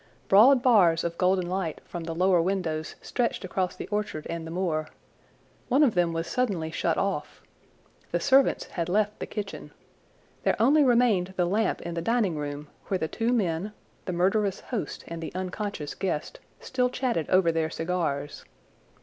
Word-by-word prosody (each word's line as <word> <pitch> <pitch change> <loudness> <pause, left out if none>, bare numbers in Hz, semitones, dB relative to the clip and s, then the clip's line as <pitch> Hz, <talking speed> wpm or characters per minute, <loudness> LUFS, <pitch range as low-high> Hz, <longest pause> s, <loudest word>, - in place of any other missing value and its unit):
Broad 245 +6 +7
bars 180 -10 +5
of 170 0 -2
golden 185 -1 +2
light 180 -3 -2
from 170 -2 -6
the 165 0 -4
lower 180 0 +3
windows 165 -4 -2
stretched 235 -5 -1
across 185 0 -2
the - - -7
orchard 210 -7 -3
and 165 -1 -5
the - - -7
moor. 165 -3 -1 0.8
One 270 +4 +4
of 255 -7 +4
them 175 -2 +2
was 165 0 -2
suddenly 175 -5 -1
shut - - 0
off. - - -2 0.7
The - - 0
servants 275 0 +3
had 170 -1 -4
left 210 +2 +1
the - - -4
kitchen. 210 -2 -6 0.7
There - - +2
only 285 +7 +5
remained 230 -8 +3
the 180 - +3
lamp 210 +5 0
in 170 - -5
the 170 - -2
dining 215 -3 +1
room 145 0 -5 0.2
where 190 - 0
the 160 - -2
two 230 +7 -1
men, 200 -3 0 0.3
the 185 - -3
murderous 195 +3 +1
host 235 -5 -5
and 165 0 -6
the 160 - -5
unconscious 185 -4 -4
guest, 175 -6 -3 0.2
still 250 -1 0
chatted 245 - -1
over 185 -2 +4
their 160 -1 0
cigars. 165 -4 -3
185 Hz, 170 wpm, -27 LUFS, 165-215 Hz, 0.8 s, Broad